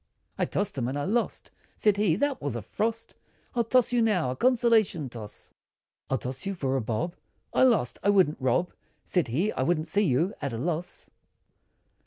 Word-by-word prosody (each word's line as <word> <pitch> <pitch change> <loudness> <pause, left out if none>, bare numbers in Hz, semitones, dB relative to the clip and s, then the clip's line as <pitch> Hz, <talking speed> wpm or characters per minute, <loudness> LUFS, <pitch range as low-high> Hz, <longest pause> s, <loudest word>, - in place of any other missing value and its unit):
I - - 0
tossed 200 -9 -2
him, 120 - -1
and 135 +3 -2
I 145 - -2
lost, 230 +7 -1 0.3
Said 210 -2 +3
he 200 -6 +3
"That 285 +6 -1
was 140 -4 -3
a 115 - -4
frost, 225 - -3 0.4
I'll 235 - +2
toss 245 +1 +2
you 240 - +3
now, 185 - +2
a - - -4
consolation 225 - +2
toss, 110 -3 -10 0.6
I'll 135 - +1
toss 130 +1 -5
you, 195 - -2
for 135 -6 -1
a 135 - +1
bob" 120 +11 -2 0.4
I - - +2
lost! 235 - +3
"I 200 - +2
wouldn't 185 -8 +3
rob" 130 +8 +1 0.3
Said 180 -3 +1
he 165 - 0
"I - - -3
wouldn't 155 +3 +1
see 185 +6 +1
you, 175 - +2
at 140 -4 -3
a - - -3
loss. 165 +6 -4
175 Hz, 195 wpm, -27 LUFS, 130-215 Hz, 0.6 s, Said